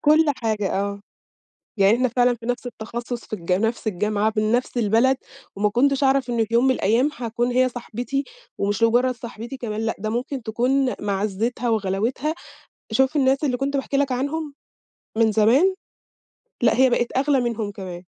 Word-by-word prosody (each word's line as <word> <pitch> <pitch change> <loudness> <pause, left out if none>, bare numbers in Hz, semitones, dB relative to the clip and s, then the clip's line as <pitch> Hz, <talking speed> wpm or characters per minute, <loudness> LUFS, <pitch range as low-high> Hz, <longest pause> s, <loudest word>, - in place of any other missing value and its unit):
كُلّ 310 +2 +5
حاجة 215 -4 -1
آه. 200 0 -3 0.8
يعني 200 +3 +5
إحنا 255 0 +1
فعلًا 245 +1 +2
في 230 0 -11
نَفْس 245 +1 -2
التخصص 235 +1 -6
في - - -28
الجا 180 -2 0
في - - -2
نَفْس 230 0 -4
الجامعة 210 +2 0
من 215 +1 +1
نَفْس 245 +1 0
البلد، 235 +4 +3 0.4
وما 210 +1 +2
كُنتش 275 +5 +2
أعرف 265 -2 +2
إنّه 230 -1 +1
في 230 +2 -6
يوم 240 +2 +4
من 265 - +4
الأيّام 240 +8 +2
هاكون 240 0 -2
هي 255 +1 +3
صاحبتي، 245 +3 -4 0.3
ومش 205 +3 -1
مجرّد 245 +2 +3
صاحبتي 235 +2 -8
كمان، 220 -3 -4
لأ 225 0 -1
ده 215 +2 -3
ممكن 250 +3 -3
تكون 255 +4 +1
معزّتها 210 +4 -1
وغلاوتها، 225 +8 0 0.6
شوف 265 +6 +2
الناس 270 +1 +2
اللي 250 -4 +1
كُنت 280 +2 -2
باحكي 275 0 -1
لك 275 -1 +1
عنهم 285 +4 -2 0.7
من 220 -1 +4
زمان، 255 - +4 0.9
لأ 235 - +4
هي 260 +1 +5
بقِت 240 +1 0
أغلى 275 0 +3
منهم 225 -4 -2
كمان. 185 -3 -8
240 Hz, 175 wpm, -23 LUFS, 215-260 Hz, 0.9 s, كُلّ